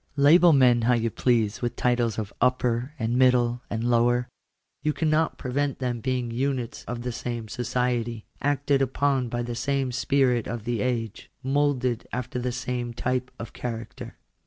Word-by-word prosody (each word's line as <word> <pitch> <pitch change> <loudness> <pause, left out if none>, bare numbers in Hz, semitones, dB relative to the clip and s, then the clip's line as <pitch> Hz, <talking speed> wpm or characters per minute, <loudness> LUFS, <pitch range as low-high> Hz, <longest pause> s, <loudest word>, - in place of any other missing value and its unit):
Label 165 +5 +6
men 125 -4 +5
how 120 +2 +3
you 115 -1 0
please 115 -4 +1
with 120 -1 -2
titles 120 -2 +1
of 105 -2 -4
" - - -43
upper," 125 +2 +1
and 120 +1 0
"middle," 125 -2 +3
and 115 0 -2
"lower," 120 +1 +2 0.5
you 150 - 0
cannot 155 0 +1
prevent 140 +2 -1
them 125 -2 -2
being 125 -2 -1
units 125 -1 -2
of 120 0 -5
the 125 - -2
same 120 -1 -4
society, 120 -1 -2 0.2
acted 140 0 +1
upon 135 -1 +1
by 120 +1 -2
the 120 0 -4
6ame 135 +1 -1
spirit 130 -2 +2
of 120 -3 -4
the 120 -2 -2
age, 115 -4 -3
moulded 135 -3 0
after 125 0 -3
the 125 0 -2
same 125 -1 -3
type 125 +1 -1
of 115 - -8
character. 115 -2 -6
125 Hz, 165 wpm, -26 LUFS, 120-130 Hz, 0.5 s, Label